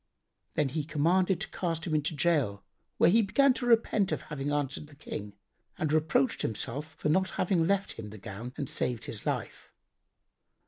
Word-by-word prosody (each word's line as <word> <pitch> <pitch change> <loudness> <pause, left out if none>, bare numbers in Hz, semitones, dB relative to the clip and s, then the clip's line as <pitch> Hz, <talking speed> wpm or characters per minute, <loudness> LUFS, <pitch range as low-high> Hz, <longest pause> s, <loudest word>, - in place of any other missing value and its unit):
Then 150 -3 +2
he 155 +3 -2
commanded 170 +5 +2
to - - -3
cast 165 -3 -2
him 165 - -2
into 155 +1 0
gaol, 140 -9 +1 0.3
where 170 - +6
he 225 +4 +6
began 265 +7 +4
to 245 -1 -3
repent 220 -4 +3
of - - -2
having 145 -2 -4
answered 145 0 -2
the 145 - -16
King 105 -8 -6 0.4
and 155 -1 0
reproached 155 -4 +2
himself 140 +7 -3
for - - -2
not 185 +4 +3
having 175 -3 +2
left 200 0 +1
him 105 -2 -7
the 105 - -10
gown 105 +5 -7
and 145 -3 -3
saved 120 -3 -2
his 105 - -6
life. - - -3
155 Hz, 180 wpm, -30 LUFS, 135-180 Hz, 0.4 s, where